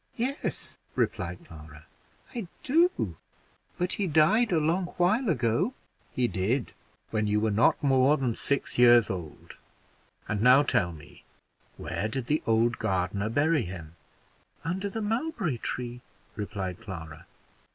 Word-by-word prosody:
"Yes," 260 +4 -3 0.2
replied 85 +1 -2
Clara, 75 -2 -13 0.5
"I 230 -7 -4 0.2
do; 330 +6 +2 0.6
but 180 0 0
he 200 - -1
died 170 +10 +4
a 170 - +3
long 165 +4 +1
while 215 +7 +2
ago." 150 - +1 0.4
"He 125 -1 +1
did, 110 +6 -1 0.4
when 110 -1 0
you 105 +1 +2
were 110 0 +1
not 110 +7 +3
more 135 +1 +4
than 125 -5 0
six 140 +2 -1
years 120 -2 +6
old. 85 -5 -8 0.7
And 105 -1 -2
now 130 +4 +7
tell 90 -10 +1
me, 85 +2 -14 0.5
where 95 +6 -3
did 125 +2 -3
the 150 +5 +1
old 115 +1 +2
gardener 100 0 -1
bury 145 +5 +2
him?" 85 -5 -8 0.7
"Under 190 +5 -2
the 220 +2 -4
mulberry 215 - -1
tree," 125 +1 -4 0.3
replied 100 -4 -4
Clara. 80 -4 -9
120 Hz, 135 wpm, -28 LUFS, -, 0.7 s, now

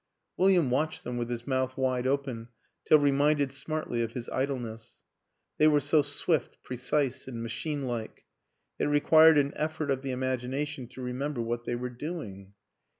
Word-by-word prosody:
William 180 -8 +3
watched 155 +5 -1
them 125 - -4
with 120 -1 -3
his 120 -1 -4
mouth 130 -1 -1
wide 130 -1 0
open 130 -4 -2 0.4
till 155 - +7
reminded 145 0 +2
smartly 140 -3 -2
of 115 0 -3
his 125 -2 -5
idleness; 120 -5 -4 0.6
they 155 - +6
were 150 -1 +5
so 145 +2 +3
swift, 145 +3 0
precise 130 +2 -1
and 115 -3 -5
machine 140 +5 -3
like. 120 -3 -5 0.5
It - - +1
re 145 0 +3
quired 160 +1 +7
an 140 0 +2
effort 155 -1 -2
of 135 -1 0
the 135 - -5
imagination 130 +2 -2
to 130 +2 -11
remember 130 +2 -3
what 120 +1 -2
they 120 - -1
were 125 +1 -4
doing. 120 - -7
130 Hz, 165 wpm, -29 LUFS, 120-150 Hz, 0.6 s, till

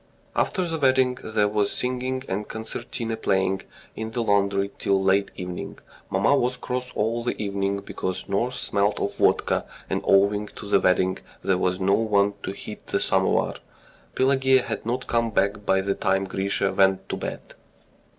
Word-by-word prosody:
After 185 -3 +1
the 165 -1 -3
wedding 130 -2 +3
there 110 -1 +1
was 105 -1 +1
singing 130 +1 -2
and 100 +2 -3
concertina 115 0 -4
playing 95 -3 +1 0.3
in 110 0 -4
the 120 +1 -2
laundry 100 -1 +2
till 100 -1 +2
late 95 +1 +2
evening. 90 -1 -6 0.3
Mamma 100 +9 +3
was 125 -1 +1
cross 125 0 -4
all 115 +2 0
the 120 - -2
evening 100 -1 -1
because 95 -1 -4
nurse 120 +6 -1
smelt 100 +1 0
of 100 - -2
vodka, - - +2 0.3
and - - 0
owing 100 +2 +3
to 105 - -8
the - - +4
wedding 95 0 +2 0.2
there 95 -1 +2
was 90 0 0
no 95 +1 +2
one 100 -2 +3
to - - -4
heat 105 +2 -9
the - - 0
samovar. - - +1 0.6
Pelageya 130 -1 +4
had 110 -1 -5
not 125 +2 -1
come 115 -1 +1
back 100 -1 0
by 95 0 +4
the 100 +1 0
time 95 0 +1
Grisha 95 +1 -1
went 95 0 +3
to - - -2
bed. - - -6
105 Hz, 170 wpm, -25 LUFS, 95-120 Hz, 0.6 s, the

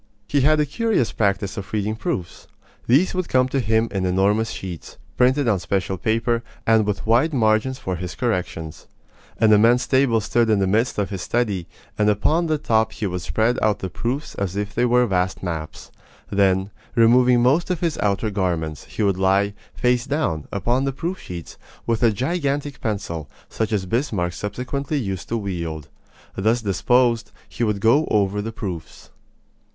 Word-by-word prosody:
He 145 - +2
had 155 +3 +4
a 150 - +3
curious 215 - 0
practise 100 -2 -1
of 100 - -6
reading 105 0 -1
proofs. 95 -5 -4 0.4
These 140 +10 +4
would 185 -2 -2
come 130 0 +3
to 135 - 0
him 110 -1 +1
in 95 -2 -2
enormous 100 +4 +2
sheets, 90 -4 -7 0.2
printed 130 +2 +3
on 105 -5 +2
special 95 +2 -1
paper, 115 +1 0 0.2
and 110 -2 +4
with 100 -1 -2
wide 125 +8 +3
margins 110 +2 +2
for 95 -8 -3
his 90 +1 -6
corrections. 90 -9 -3 0.5
An 110 -1 +5
immense 115 +4 +5
table 130 -4 +3
stood 115 +2 +1
in 110 - +4
the 100 - +2
midst 110 +6 +1
of 105 -1 -1
his 95 -2 -4
study, 105 -8 -1 0.3
and 105 0 +4
upon 155 - +2
the 155 -1 +1
top 110 -5 +1
he 110 - -4
would 90 -2 -2
spread 110 +10 0
out 105 -1 +2
the 95 - -5
proofs 130 +6 -3
as 100 -2 -3
if 105 0 -3
they 120 - +2
were 125 0 +4
vast 95 -3 -1
maps. 80 -4 -5 0.4
Then, 95 0 +2 0.2
removing 120 +1 +5
most 145 +9 +3
of 180 -3 -1
his 170 -3 -1
outer 105 +1 0
garments, 85 -7 -2
he - - -3
would 100 -2 +1
lie, 100 +2 +2 0.2
face 125 +1 +1
down, 135 - -1
upon 120 +6 0
the 135 - -1
proof 175 +7 -4
sheets, 85 -2 -9 0.3
with 115 -1 0
a 120 - +5
gigantic 140 - -2
pencil, 90 - -3 0.2
such 110 -1 -2
as 100 -3 0
Bismarck 95 - -1
subsequently 130 - -3
used 95 -8 -4
to 115 - 0
wield. 85 -7 -4 0.5
Thus 110 +4 +1
disposed, 115 +4 +2 0.2
he - - -4
would 105 -3 0
go 120 +9 +3
over 105 -1 +1
the 110 +2 -4
proofs. 95 -7 -7
110 Hz, 180 wpm, -22 LUFS, 95-125 Hz, 0.5 s, An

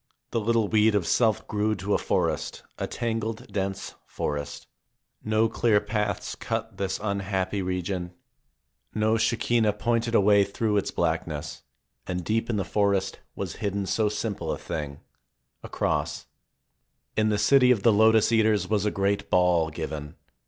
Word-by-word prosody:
The 115 - 0
little 115 0 +1
weed 110 0 +3
of 100 -4 +1
self 110 +6 +2
grew 105 +1 0
to 100 +2 -2
a - - +2
forest, - - -1 0.2
a - - -2
tangled, 115 -1 -3
dense 95 -1 -3
forest. 75 0 -4 0.6
Ko 110 +1 +3
clear 110 -1 +2
paths 105 -1 -2
cut 115 -2 -4
this 95 -1 -2
unhappy 100 -1 -1
region, 90 -1 -3 0.8
no 110 +1 +2
Shekinah 115 -1 +2
pointed 115 +2 0
a - - +7
way 100 0 +5
through 105 +2 -1
its 100 - 0
blackness, 75 -1 -2 0.5
and 90 -1 -3
deep 115 +2 0
in 115 - 0
the 95 - -1
forest 100 -2 0 0.2
was - - -5
hidden 100 -1 -2
so 105 +2 +1
sim 105 +1 -2
ple - - -4
a - - -2
thing 75 -2 -5 0.3
— - - -51
a - - -8
cross. - - -1 0.9
In 110 0 +2
the 105 - +1
city 125 +5 +5
of 115 -6 +3
the 115 - +5
Lotus 110 +1 +5
eaters 110 -4 +3
was 105 -1 0
a - - +3
great 100 0 -1
ball 90 -3 +3
given. 75 -2 -6
105 Hz, 160 wpm, -26 LUFS, 95-110 Hz, 0.9 s, a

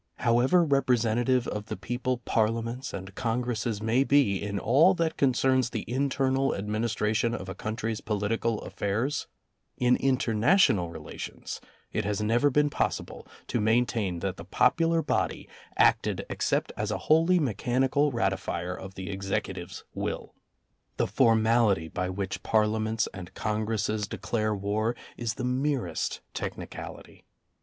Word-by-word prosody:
However 125 +9 +3
representative 125 -3 +2
of 105 0 -4
the - - -4
people 125 0 -2
Parlia 115 +1 +1
ments 125 +3 -5
and 95 0 -7
Congresses 115 -1 -2
may 115 +4 +3
be 140 -9 +3
in 100 0 -3
all 150 - +5
that 165 -2 0
concerns 130 -1 +2
the 110 - -4
internal 135 +1 +1
administration 110 +2 0
of 95 - -6
a 95 - -4
country's 110 +2 -3
political 110 +1 -1
affairs, 115 +9 -2 0.5
in 125 0 +4
international 120 - +3
relations 80 -2 -7 0.3
it - - 0
has 105 0 -1
never 115 +6 +3
been 150 +2 +2
possible - - -2 0.2
to 120 - -1
maintain 110 -5 +1
that 95 -2 -2
the - - -8
popular 165 0 +2
body - - -1 0.3
acted - - +3
except - - 0
as - - -2
a - - -1
wholly 165 +4 +5
mechanical 135 - +1
ratifier 95 -5 -1
of 95 0 -9
the 95 +1 -5
Executive's 95 0 -4
will. - - -4 0.6
The - - +2
formality 110 -6 +3
by 90 +3 -2
which 95 0 -4
Par 110 -1 +3
liaments 110 +1 0
and 90 -2 -9
Congresses 110 -1 -1
declare 110 0 -1
war 105 +4 -1 0.2
is 115 -2 -3
the 125 - -5
merest 125 - -1
technicality. - - -7
115 Hz, 135 wpm, -28 LUFS, 105-130 Hz, 0.6 s, all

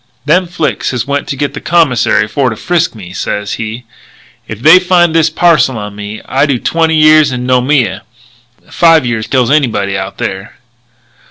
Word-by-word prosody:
'Them 175 +5 +2
Flics 170 -3 -2
has 120 -3 -3
went 140 0 -3
to - - -4
get 145 +1 -3
the - - -7
Commissaire 125 -10 +1
for 130 +4 -1
to 110 - -5
frisk 175 +4 -1
me,' 90 -4 -11
sez 100 +2 -4
he. 110 +2 -6 0.6
'If 110 - -7
they 165 +4 +7
find 180 -2 +2
this 165 -1 +2
parcel 155 -6 +2
on 105 -1 -7
me 105 +1 -8
I 135 +3 0
do 140 -3 0
twenty 160 +5 0
years 155 -2 +4
in 125 -1 -4
Noumea. 125 -5 +1 0.7
Five 165 -4 +3
years 115 -2 -3
kills 130 -2 0
anybody 110 -10 0
out 95 0 -5
there.' 95 +2 -5
130 Hz, 175 wpm, -11 LUFS, 110-160 Hz, 0.7 s, they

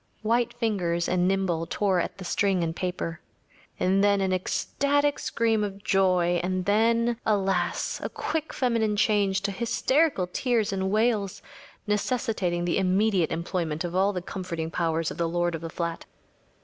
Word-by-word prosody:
‚ÄĚ - - -40
White 235 +2 +1
fingers 180 -8 0
and 180 0 +2
nimble 185 -4 0
tore 195 -3 +1
at 175 - -3
the 190 - -8
string 190 -1 +1
and 165 0 -2
paper. 175 -3 -4 0.6
And 195 +2 +2
then 200 -1 +4
an 190 -1 +1
ecstatic 285 +9 0
scream 225 -2 +1
of 200 -1 -5
joy; 180 -3 +2
and 185 0 -1
then, 230 +3 +2
alas! 195 -4 0
a - - -2
quick 315 0 -3
feminine 230 -4 +1
change 200 -2 +2
to 200 +1 -1
hysterical 250 - +1
tears 220 +2 0
and 190 0 -1
wails, 215 -2 0 0.4
necessitating 210 -5 -1
the 175 - +1
immediate 190 -1 +2
employment 165 -1 -2
of 175 0 -4
all 195 +2 +3
the 180 -3 -4
comforting 170 -4 -5
powers 165 -1 0
of - - -9
the 170 -1 +1
lord 175 0 0
of 165 - -4
the 165 - -5
flat. 170 0 -4
195 Hz, 160 wpm, -26 LUFS, 175-215 Hz, 0.6 s, then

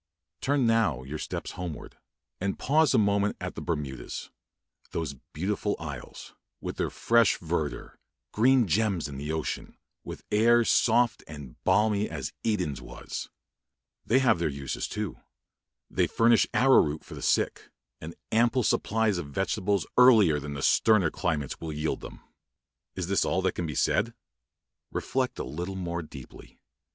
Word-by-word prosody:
Turn 140 -2 +2
now 110 - +2
your 75 +4 -6
steps - - -5
homeward, 85 -5 -7 0.4
and 95 +1 -2
pause 155 0 +3
a - - +5
moment 100 -1 +2
at - - -5
the - - -7
Bermudas, 75 -6 -4 0.6
those 80 -4 -2 0.2
beautiful 100 +5 -1
isles, 75 -6 -8 0.3
with - - -6
their - - 0
fresh 115 -3 +3
verdure 80 -3 -4 0.3
green 125 +1 +4
gems 95 -2 +1
in 70 -1 -7
the 75 +2 -4
ocean, 80 -1 -4 0.3
with - - -8
air 115 +2 +4
soft 120 +1 +3
and 75 -5 -11
balmy 105 -1 +2
as 75 -5 -5
Eden's 90 - -1
was! - - -7 0.7
They 120 - +3
have 120 -8 +3
their 85 - +1
home 70 - -6
uses 70 -2 -3
too. 105 -4 -4 0.7
They - - +1
furnish 115 0 +4
arrow 135 +1 +6
root 75 +1 -3
for - - -11
the - - -8
sick, - - 0 0.3
and 80 +2 -8 0.2
ample 120 +3 +3
supplies 110 -3 +1
of 75 - -5
vegetables 95 +6 -1
earlier 110 -12 +6
than 70 0 -6
sterner 105 -8 +4
climates 75 -6 -2
will 80 -1 -4
yield 75 +1 -2
them. - - -10 0.7
Is 95 - -2
this 100 +2 +1
all 95 - 0
that 95 - +2
can 85 - -3
be 75 - -5
said? 115 - +1 0.8
Reflect - - -2
a - - -3
little 85 +9 -5
more 85 -2 -3
deeply. 75 -5 -12
95 Hz, 155 wpm, -28 LUFS, 75-110 Hz, 0.8 s, arrow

